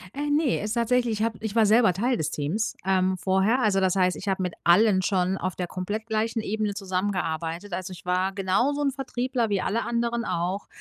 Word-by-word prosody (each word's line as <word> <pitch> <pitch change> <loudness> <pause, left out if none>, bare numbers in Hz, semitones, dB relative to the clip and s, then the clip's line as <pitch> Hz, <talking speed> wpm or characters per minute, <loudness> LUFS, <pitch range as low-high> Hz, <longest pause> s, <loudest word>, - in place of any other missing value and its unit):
Äh, 290 +1 -2
ne, 290 -2 +2
ist 210 +1 -3
tatsächlich 240 0 +1
ich - - +2
hab 225 -1 0
ich 220 -1 -4
war 225 -2 +5
selber 220 -2 +5
Teil 240 +7 0
des 155 -3 -2
Teams, 160 +10 -2
ähm, 190 -1 +2
vorher. 190 +7 +2
Also 205 -4 +2
das 190 -1 +2
heißt, 185 -1 +2
ich - - -9
habe 190 -1 0
mit 180 -2 -2
allen 190 +2 +5
schon 185 0 0
auf 185 -1 -3
der 180 - -3
komplett 205 +5 -4
gleichen 225 0 -1
Ebene 215 -1 -2
zusammengearbeitet. 185 -2 -3
Also, 185 +1 -4
ich 175 - -13
war 185 +2 0
genauso 200 +10 +1
'n 280 -1 +1
Vertriebler 255 -2 -2
wie 200 -2 0
alle 230 +3 -1
anderen 235 0 -1
auch. 180 +4 -2
205 Hz, 210 wpm, -25 LUFS, 185-230 Hz, -, war